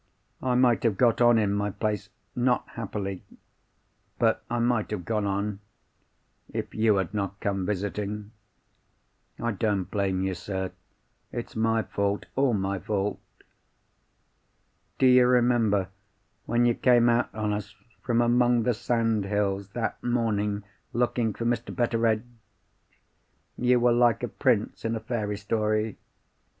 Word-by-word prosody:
I 125 -1 +1
might 125 -2 +4
have 110 -5 +1
got 120 -2 +3
on 120 -1 +6
in 105 -2 +2
my 105 0 0
place—not 110 +4 -2
happily—but 105 +2 -5
I 120 - -1
might 120 -2 +1
have 100 -5 -4
got 105 +1 0
on, 100 0 -2 0.9
if - - -4
you 110 -1 +3
had 95 -1 -1
not 100 -1 -3
come 95 -2 -1
visiting. 105 +1 -3 1.1
I 115 0 -1
don't 105 -1 0
blame 95 -2 0
you, 95 0 -1
sir. 95 +1 -4 0.6
It's 120 - -6
my 115 0 +1
fault—all 105 +6 0
my 95 -1 -1
fault. 100 0 -2 1.8
"Do - - +3
you 125 -1 +6
remember 120 -6 +3 0.6
when 120 +1 +2
you 120 - +4
came 120 0 +4
out 120 0 +2
on 105 -1 -1
us 105 0 -5 0.3
from 120 -1 +1
among 120 0 +3
the 125 - +2
sandhills, 105 -4 0
that 115 -2 -3
morning, 105 -4 0 0.3
looking 120 -1 +1
for 115 - -5
Mr. 120 -1 -1
Betteredge? 115 -2 +1 1.3
You 125 0 +3
were 120 0 +4
like 120 -2 +3
a - - 0
prince - - 0
in 115 0 -1
a - - -2
fairy 110 -2 -3
story. 110 +1 -1
110 Hz, 130 wpm, -27 LUFS, 100-120 Hz, 1.8 s, on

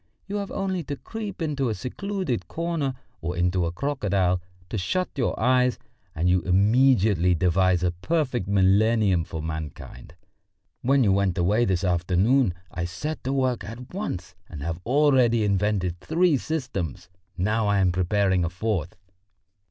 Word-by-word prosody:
You 200 +2 -3
have 200 -1 -4
only 190 -2 -2
to 145 - -4
creep 205 +1 -6
into 140 -5 -1
a 110 - -1
secluded 130 - -3
corner 165 - -2 0.3
or 85 +2 -3
into 90 0 +1
a - - -2
crocodile, 95 -6 0 0.3
to 110 - -2
shut 185 - -1
your 130 - -1
eyes, 125 +1 +3 0.4
and 85 +2 0
you 90 0 +3
immediately 100 -1 +3
devise 90 +1 +2
a 90 - +2
perfect 125 - -1
millennium 100 -1 +3
for 80 -1 -6
mankind. 80 -5 -7 0.7
When 135 +1 +3
you 100 - +3
went 100 -1 +1
away 105 +7 +2
this 95 -4 0
afternoon 90 +5 +2 0.2
I 85 0 -3
set 145 - -5
to 130 - 0
work 130 -3 0
at 120 +6 -9
once 95 - -4 0.2
and 70 -3 -7
have 85 +1 -3
already 130 -4 +4
invented 100 -3 0
three 165 - +2
systems, 120 - -3 0.3
now 105 +4 +1
I 100 0 +2
am 95 -2 +3
preparing 95 +1 +1
the 85 - 0
fourth. 90 -2 -2
100 Hz, 150 wpm, -25 LUFS, 90-135 Hz, 0.7 s, already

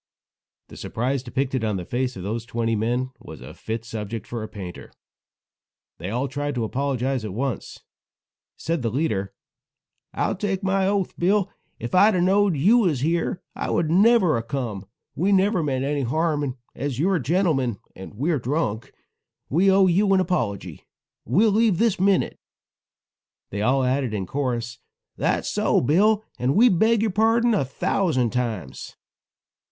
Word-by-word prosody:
The - - -12
surprise 125 +4 -2
depicted 130 0 -2
on 105 -3 0
the 90 - -6
faces 125 +3 -2
of 90 - -7
those 110 +4 -4
twenty 115 -1 -1
men 120 +4 -1
was - - -11
a - - -10
fit 115 +1 -5
subject 110 -1 -5
for 120 -2 -5
a 110 - -5
painter. 95 -5 -9 1.1
They 90 +3 -5
all 125 +6 -1
tried 145 +1 -3
to 120 - -1
apologize 130 +1 -1
at 105 -3 -5
once. 130 -2 -4 0.7
Said 165 -1 -2
the 115 - 0
leader: 105 -7 -1 0.8
"I'll - - -1
take 195 0 -2
my 190 0 +1
oath, 200 -2 0
Bill, 195 +2 +2 0.3
if 120 - -6
I'd 205 +3 +5
a - - +1
knowed 195 -1 +3
you 205 - +5
was 165 - +1
here 170 +3 -1
I - - -3 0.2
never 185 +2 +4
would 115 - +1
a - - -3
come; 115 -6 -4 0.3
we 185 +7 0
never 195 -1 +3
meant 135 -3 -1
any 145 0 -1
harm, 155 +4 0
and 135 -3 -3 0.2
as 140 -3 -4
you 160 +7 +1
are 190 - +2
a - - -3
gentleman, 135 - +1 0.2
and 95 +2 -10
we're 150 +6 0
drunk, 120 -4 -2 0.6
we 180 +7 +3
owe 190 0 +5
you 195 +3 +3
an - - +3
apology. 120 - -2 0.4
We'll 205 - +3
leave 215 -3 +3
this 225 -2 +1
minute." 195 0 +1 1.1
They 100 - -3
all 130 +4 +2
added 130 -3 0
in 95 -2 -2
chorus: 120 -1 -3 0.4
"That's - - 0
so, - - +2
Bill, 205 - +3 0.2
and 130 +3 +1
we 245 +4 +6
beg 220 +4 +3
your 220 - +1
pardon 225 +3 +3
a 205 - +2
thousand 130 - 0
times." 110 - -4
140 Hz, 170 wpm, -23 LUFS, 115-190 Hz, 1.1 s, we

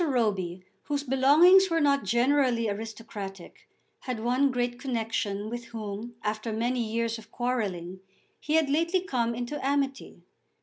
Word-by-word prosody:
Roby, 200 - 0 0.2
whose 285 -1 -2
belongings 300 +9 +6
were 330 -1 +2
not 280 -4 +3
generally 240 +1 +2
aristocratic, 205 -3 -7 0.3
had 250 -4 -4
one 250 +5 +2
great 245 -1 -2
connexion 225 -5 -2
with 240 +1 -5
whom, 225 0 -6
after 215 +2 -2
many 240 +3 -1
years 230 0 -1
of - - -15
quarrelling, 195 -8 -2 0.4
he 305 - -1
had 320 -2 +4
lately 335 +6 +1
come 235 -9 -1
into 245 +5 -4
amity. 275 0 -2
240 Hz, 135 wpm, -28 LUFS, 220-275 Hz, 0.4 s, belongings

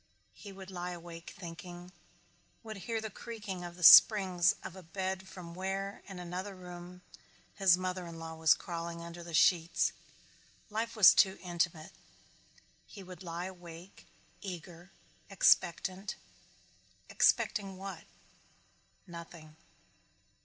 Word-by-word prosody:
He 200 - -11
would 190 0 -11
lie 180 -1 -4
awake 170 -1 -10
thinking, 175 0 -9 0.7
would 220 -2 -7
hear 225 +4 -3
the 220 -1 -6
creaking 210 -4 -7
of 175 0 -8
the 180 - -9
springs 185 -1 +8
of 185 - -8
a 190 - -10
bed 190 +2 -4
from 180 -3 -10
where, 195 +2 -4
in 195 - -8
another 180 +3 -6
room, 180 0 -11 0.5
his 190 -3 +4
mother 185 -1 -4
in 165 -1 -9
law 165 0 -7
was 160 0 +4
crawling 170 -1 -6
under 170 0 -9
the 170 -1 -5
sheets. 170 +2 +3 0.8
Life 225 +2 -2
was 215 -4 +9
too 190 0 +4
intimate. 170 -2 -2 1.0
He 200 - -11
would 185 0 -11
lie 170 0 -5
awake 175 0 -11 0.3
eager, 175 -1 -8 0.4
expectant 190 0 +2 0.9
expecting 195 -2 +1
what? 195 +1 -8 1.0
Nothing. 170 -3 -11
180 Hz, 125 wpm, -32 LUFS, 170-190 Hz, 1.0 s, was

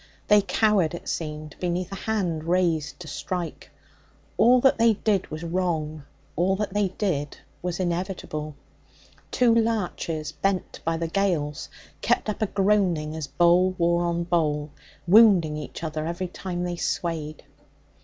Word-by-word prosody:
They 210 0 +7
cowered, 195 -3 +2
it - - -9
seemed, 155 -1 -4
beneath 180 +1 -2
a - - -4
hand 175 -8 -1
raised 170 -3 0
to 165 - -8
strike. 175 +2 -5 0.7
All 250 +2 +5
that 265 -3 +4
they 230 0 +5
did 205 -2 0
was 155 +2 -6
wrong; 165 -4 -2 0.3
all 185 +4 +2
that 205 -1 -3
they 205 -1 +2
did 180 -7 -2 0.2
was 180 0 -3
inevitable. 175 -4 -3 0.7
Two 245 -2 +3
larches 205 -8 -1
bent 195 -2 -2
by 165 0 0
the 165 0 -2
gales 165 -6 -1 0.3
kept - - +1
up 215 - -4
a 215 - +2
groaning 190 -7 +1
as 155 -2 -4
bole 175 +5 +3
wore 170 0 +2
on 170 0 0
bole, 155 -4 0 0.3
wounding 185 -5 +6
each 150 +2 -7
other 155 0 -3
every 175 +2 -3
time 180 -1 -4
they 175 -1 -3
swayed. 160 -4 -3
175 Hz, 145 wpm, -25 LUFS, 155-195 Hz, 0.7 s, They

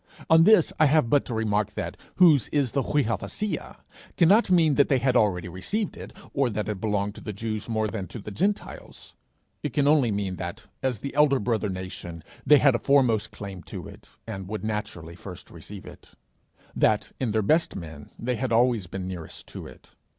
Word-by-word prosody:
On 165 0 +7
this 215 -6 +5
I 155 - +6
have 145 -5 +2
but 145 - +3
to 120 - -4
remark 105 -2 0
that - - -4 0.2
'whose 155 - +6
is 140 -5 0
the 140 - +1
[Greek: 145 0 +1
viothesia]' 200 - -3 0.4
cannot 195 +7 +5
mean 170 -4 +4
either 140 - -1
that 140 - +4
they 135 - +4
had 130 0 +1
already 95 -7 +2
received 170 - -3
it, - - -9 0.2
or 135 -3 +2
that 105 -1 -3
it 105 -3 -4
belonged 105 -2 -1
to - - -11
the 105 - -5
Jews 110 +2 -4
more 110 -1 0
than 100 -3 -5
to - - -8
the 105 -1 -8
Gentiles; 200 - -3 0.5
it - - -4
can 145 -2 +2
only 145 -5 +4
mean 100 -3 -2
that, - - -6 0.2
as 130 -3 0
the 140 - -5
elder 145 -3 +4
brother 105 0 -1
nation, 90 -3 -6 0.2
they 150 - +8
had 140 -1 +5
a 120 - 0
foremost 120 -6 +3
claim 100 -3 -8
to - - -7
it, - - -14
and 95 -4 -6
would 105 +2 -5
naturally 95 -6 -4
first 90 0 -10
receive 100 -2 -10
it; - - -14 0.6
that, - - +2
in 125 -4 -1
their 110 0 +1
best 160 +11 +2
men, 80 -4 -8
they 125 0 -2
had 125 +1 -2
always 115 -4 +2
been 95 +1 -5
nearest 90 -4 -7
to - - -8
it. - - -16
110 Hz, 205 wpm, -26 LUFS, 100-140 Hz, 0.6 s, they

